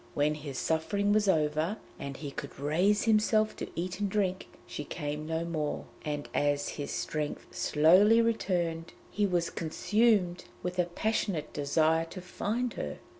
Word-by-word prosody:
When 150 +1 +2
his 145 -3 -6
suffering 200 +8 +1
was 210 -1 +3
over, 155 +3 +1 0.2
and 140 -1 -5
he 145 -3 -6
could 140 0 -8
raise 180 +9 +2
himself 215 -1 +3
to - - -5
eat 180 +2 -3
and 205 -1 0
drink, 190 -2 0 0.2
she 150 - -5
came 150 0 -4
to 160 - -3
him 160 - 0
no - - -5
more, 155 -3 -2 0.2
and 145 -1 -3
as 145 0 +1
his 145 - -5
strength 150 -1 -3
slowly 185 +9 +5
returned 175 -8 0 0.2
he 205 -1 +1
was 175 -2 0
consumed 185 +1 +1 0.2
with 180 +1 -3
a 180 - +4
passionate 180 -2 -1
desire 160 +3 +2
to 175 +3 -9
find 225 +6 -2
her. 75 -1 -4
170 Hz, 165 wpm, -30 LUFS, 150-205 Hz, 0.2 s, slowly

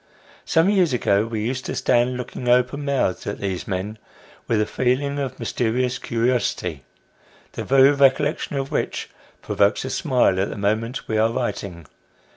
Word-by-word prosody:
Some 165 +2 +3
years 185 -8 +3
ago 105 -3 +2
we 110 -2 -3
used 130 +2 -2
to - - -3
stand 125 +1 +2
looking, 125 0 -5
open 125 +4 +2
mouthed, 135 -10 -1
at 100 - -3
these 95 -3 -4
men, 105 +3 -4 0.5
with 115 - +1
a 105 - +2
feeling 135 +5 0
of 135 -2 -4
mysterious 125 +2 -1
curiosity, 115 - -1 0.7
the - - -5
very 135 +1 +5
recollection 140 +1 +2
of 135 0 -3
which - - -2 0.3
provokes 100 +5 +1
a 130 - -4
smile 125 - +2
at 100 - 0
the - - -6
moment 110 +5 -1
we 110 -1 0
are 110 +1 +3
writing. 100 -8 -4
125 Hz, 160 wpm, -22 LUFS, 105-135 Hz, 0.7 s, very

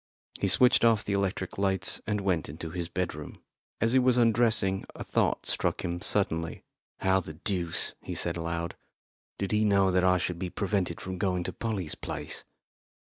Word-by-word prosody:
He - - +1
switched 125 -1 +6
off 115 -3 +4
the 100 - -1
electric 95 -1 -2
lights 95 -2 +1
and 105 -1 0
went 90 -7 0
into 80 +2 -7
his 85 -1 -4
bedroom. 85 -4 -4 0.4
As 115 +2 +2
he 130 - +6
was 125 -1 +3
undressing 115 -5 +3
a - - -6
thought - - 0
struck - - -1
him 85 0 -3
suddenly. 80 -6 0 0.4
"How 95 0 +3
the 80 -4 -6
deuce," 85 -1 -1
he - - -6
said 85 - 0
aloud, 85 0 -3 0.6
"did 100 - -3
he 105 0 +2
know 100 -2 +4
that 90 0 +2
I 90 0 +4
should 90 -1 -2
be 90 -1 -3
prevented 95 -3 -1
from 95 -1 -6
going 90 -2 0
to - - -4
Polly's 100 -8 -3
place?" - - -5
95 Hz, 180 wpm, -28 LUFS, 85-105 Hz, 0.6 s, switched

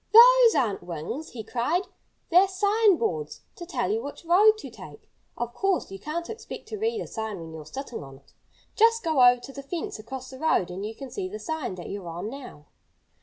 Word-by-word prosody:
"Those 480 0 +9
aren't 220 -7 +1
wings!" 175 - -5
he 225 -3 -6
cried. 275 - 0 0.5
"They're 365 +3 +7
sign 405 +1 +3
boards, 155 - -2
to 345 - -9
tell 200 - -1
you 220 +2 0
which 285 +5 -8
road 400 +6 +6
to - - -9
take. - - -12 0.3
Of 240 0 -3
course, 390 - 0
you 195 - -7
can't 335 - -4
expect 445 +1 -8
to 430 - -5
read 450 +1 0
a - - -4
sign 220 -4 -5
when 165 -1 -9
you're 155 -2 -9
sitting 265 - -6
on 135 -1 -11
it. 140 - -25 0.4
Just 460 +1 +4
go 315 -7 +3
over 245 0 +7
to 270 +3 -10
the 275 - -7
fence 275 -4 -5
across 260 +4 -7
the 260 - -10
road 240 - +2
and 190 +3 -5
you 220 +2 -5
can 270 +1 -9
see 375 -2 -4
the 420 - -6
sign 315 - -4
that 175 - -8
you're 195 -3 -6
on 175 +6 -5
now." 250 - -10
270 Hz, 220 wpm, -26 LUFS, -, 0.5 s, Those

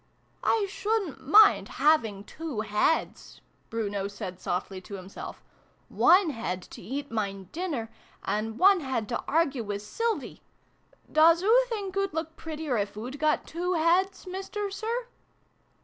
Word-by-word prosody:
" - - -39
I 440 -3 +2
shouldn't 390 -10 -2
mind 420 +6 +7
having 225 -11 +3
two 305 -1 -5
heads" 210 +9 0 0.3
Bruno 205 -3 -2
said 185 -2 -7
softly 185 +1 -3
to 200 - -8
himself: 190 0 -9 0.3
" - - -36 0.2
one 365 -2 +5
head 185 -8 -4
to - - -9
eat 270 +8 -5
mine 195 -4 -3
dinner, 315 -10 -3 0.4
and 220 +2 -2
one 390 +3 +6
head 260 -7 -2
to 235 - -2
argue 285 -5 +1
wiz 205 0 -5
Sylvie 455 - -2 0.7
doos 330 +3 +5
oo 480 +5 +5
think 400 -5 -4
oo'd 395 -4 -1
look 320 0 -3
prettier 310 -5 -3
if 205 0 -2
oo'd 250 +6 -6
got 305 0 +1
two 355 +2 -2
heads, 355 +4 +2
Mister 390 +2 -4
Sir 460 +4 -3
305 Hz, 150 wpm, -28 LUFS, -, 0.7 s, mind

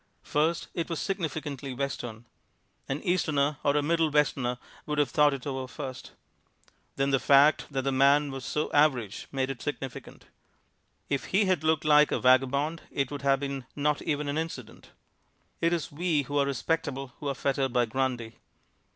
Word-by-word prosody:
First, 160 +3 0
it 170 -1 -3
was 165 - -2
significantly 150 -7 -3
Western. 120 -4 -4 0.6
An 135 +2 -3
Easterner 150 -5 +1
or 145 0 +3
a 145 - +1
Middle 165 +1 +2
Westerner 135 -4 +1 0.3
would 150 0 -2
have 145 -1 +2
thought 150 -1 +4
it 135 -2 -5
over 130 -2 -3
first. 130 -1 -7 0.8
Then 135 0 +1
the 135 - +3
fact 145 +3 +5
that 135 -2 -2
the 135 - 0
man 140 +2 +4
was 135 -1 -6
so 150 - -2
average 130 -8 +2
made 135 -1 -1
it 130 - -8
significant. 135 -3 -6 0.8
If 140 -2 -1
he 200 +2 +2
had 185 -5 +1
looked 160 -1 +1
like 150 0 +5
a - - +1
vagabond 140 +5 +3
it 140 -1 -2
would 145 -2 -5
have 135 -1 +3
been 135 -2 -4
not 150 0 0
even 150 -1 -2
an 145 +2 -1
incident. 135 -8 -7 0.7
It 170 - +3
is 170 -3 -2
we 155 -1 0
who 145 +2 -1
are 140 - +2
respectable 140 -1 -2
who 145 - -5
are 140 - -1
fettered 135 -1 0
by 120 -1 +2
Grundy. 120 -1 -2
140 Hz, 175 wpm, -28 LUFS, 135-150 Hz, 0.8 s, fact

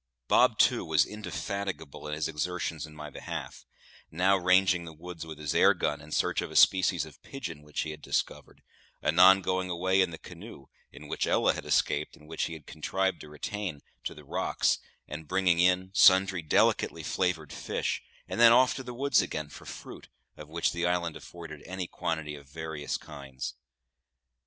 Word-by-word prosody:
Bob, - - +4
too, - - +4
was 80 -3 +3
indefatigable 100 -7 -5
in 75 - -3
his 80 0 -1
exertions 80 0 -3
in 75 - -15
my 75 -1 -8
behalf; - - -7 0.4
now 95 +4 +3
ranging 90 -1 +3
the 80 -1 -9
woods 85 +1 -8
with 80 -2 -8
his 75 -1 -3
airgun, 75 0 +3
in 75 +1 -13
search - - +1
of - - -5
a - - -10
species 95 -1 +5
of - - -15
pigeon 85 - -7
which 75 0 -4
he 80 - -3
had 75 -1 -10
discovered; - - -3 0.4
anon 95 +4 +7
going 95 0 -1
away 95 +2 +2
in 95 - +2
the 80 - -8
canoe 90 -4 -11 0.3
(in 75 +1 -12
which - - -1
Ella - - +3
had - - -7
escaped, 75 +1 +1
and 75 - -18
which 80 +1 -2
he 85 - -5
had 80 -2 -10
contrived 95 +4 -2
to 75 - -11
retain) 80 +1 -5 0.2
to - - -4
the - - -13
rocks, - - 0 0.3
and 75 +1 -7
bringing 90 -1 +2
in 90 +1 +3
sundry 95 -2 +6
delicately 80 - +2
flavoured 85 -5 -1
fish; - - -2 0.3
and - - -4
then 115 -1 +9
off 125 +2 +5
to 130 - -5
the 125 -1 -8
woods 135 -3 +3
again 80 -4 -4
for - - -12
fruit, - - -10 0.3
of 75 0 -11
which 85 +1 0
the 85 0 -1
island 85 -2 0
afforded 80 -4 -10
any 95 0 -4
quantity 80 -3 -3
of 70 -2 -12
various 80 -1 -4
kinds. 65 -2 -7
85 Hz, 185 wpm, -29 LUFS, 75-95 Hz, 0.4 s, then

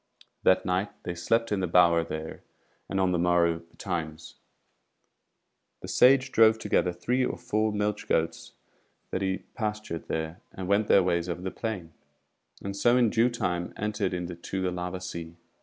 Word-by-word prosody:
That 95 - +3
night 90 +2 0
they 90 - -3
slept 115 +7 0
in 105 - +1
the 90 - 0
bower 85 -1 +5
there, 80 -1 -6 0.5
and 95 - -1
on 95 -1 +2
the 90 - +1
morrow 85 -1 +3
betimes, 85 -2 -6 1.5
the - - -6
Sage 130 +1 +5
drove 110 0 +6
together 90 -4 +1
three 125 +9 0
or - - -2
four 110 +1 0
milch 105 0 -2
goats 80 +1 -1 0.6
that 95 - -2
he 95 -1 -1
pastured 105 -6 -4
there, 80 +2 -3
and 95 -1 -6
went 100 +2 +2
their 100 - +6
ways 85 -1 0
over 90 +1 -4
the 95 - -3
plain, 95 -8 -5 0.7
and 100 0 -4
so 120 +4 +4
in 120 -4 +3
due 115 +1 +3
time 90 -7 -2
entered 105 -3 -1
into 90 +2 -5
the 95 -1 0
lava 90 +1 -4
sea. 85 -2 -7
90 Hz, 165 wpm, -28 LUFS, 85-105 Hz, 1.5 s, drove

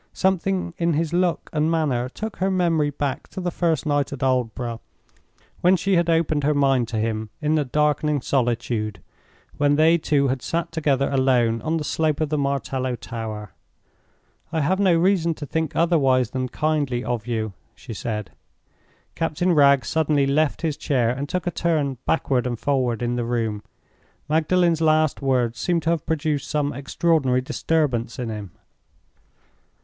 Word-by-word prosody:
Something 190 -1 0
in 170 -1 +2
his 160 +2 -1
look 175 -1 +1
and 155 0 +1
manner 140 -7 0
took 215 +9 -6
her 190 +1 0
memory 170 -5 +2
back 145 0 -3
to - - -8
the 180 -1 -2
first 165 -3 0
night 145 -2 0
at 140 -2 -5
Aldborough, 120 -2 -1 0.8
when 180 +2 +4
she 195 +1 +1
had 170 -1 +2
opened 160 -3 +1
her 150 +1 +2
mind 135 -4 +2
to 115 - -4
him 110 0 -2
in 150 +1 0
the 155 -2 +2
darkening 150 +2 +1
solitude—when 120 +2 -2
they 160 +3 +4
two 145 -3 +2
had 130 0 -1
sat 170 +4 -2
together 145 -4 +1
alone 125 -4 +2
on 160 +1 -1
the 155 - -3
slope 155 -1 0
of 155 -2 0
the 150 - 0
martello 135 -2 -1
tower. 110 -3 -6 1.0
"I 160 -2 0
have 185 +7 +1
no 190 -4 +4
reason 170 -2 +2
to 150 - -7
think 160 +2 -2
otherwise 135 -8 +2
than 130 -1 -2
kindly 145 -5 -1
of 120 0 -3
you," 110 -3 -2 0.2
she - - -9
said. 105 -1 -4 0.8
Captain 165 +3 0
Wragge 140 -3 +5
suddenly 150 -3 +1
left 145 +4 +1
his 155 -3 -1
chair, 125 -7 +1
and 140 +3 -4
took 180 -1 -2
a 175 - 0
turn 150 -7 0
backward 130 -6 +1
and 120 -1 -3
forward 125 -2 0
in 120 0 -1
the 120 - -1
room. 115 -3 -2 0.7
Magdalen's 165 +2 +2
last 155 -2 +2
words 125 -4 0
seemed 170 +4 0
to 165 - +1
have 165 -4 -2
produced 155 -2 -1
some 145 -1 0
extraordinary 140 -1 +1
disturbance 130 -4 -1
in 125 -3 -3
him. 105 -3 -6
145 Hz, 165 wpm, -23 LUFS, 125-160 Hz, 1.0 s, Wragge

